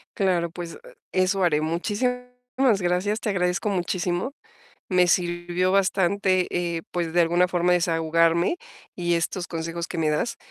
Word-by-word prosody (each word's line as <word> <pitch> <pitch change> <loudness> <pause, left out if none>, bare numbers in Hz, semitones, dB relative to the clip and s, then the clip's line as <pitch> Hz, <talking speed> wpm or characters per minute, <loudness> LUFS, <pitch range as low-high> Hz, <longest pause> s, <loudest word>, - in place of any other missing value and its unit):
Claro, 180 -4 +1
pues 170 0 -7 0.3
e 185 - +2
eso 190 +1 +1
haré. 155 -4 +2
Muchísimas 210 +10 -1 0.6
gracias. 180 +4 0
Te 220 - -3
agradezco 180 +1 0
muchísimo. 180 +4 -1 0.6
Me 180 -2 +4
sirvió 175 +1 0
bastante, 190 -1 +2
eh, 170 -2 -2
pues, 170 -2 -2
de 175 - +3
alguna 175 +2 +3
forma, 175 0 +2
desahogarme, 165 - +2 0.4
y 175 -1 0
estos 175 +2 -2
consejos 165 +1 -4
que 175 - -6
me 155 -1 +1
das, 150 +10 -1
175 Hz, 145 wpm, -24 LUFS, 170-185 Hz, 0.6 s, Me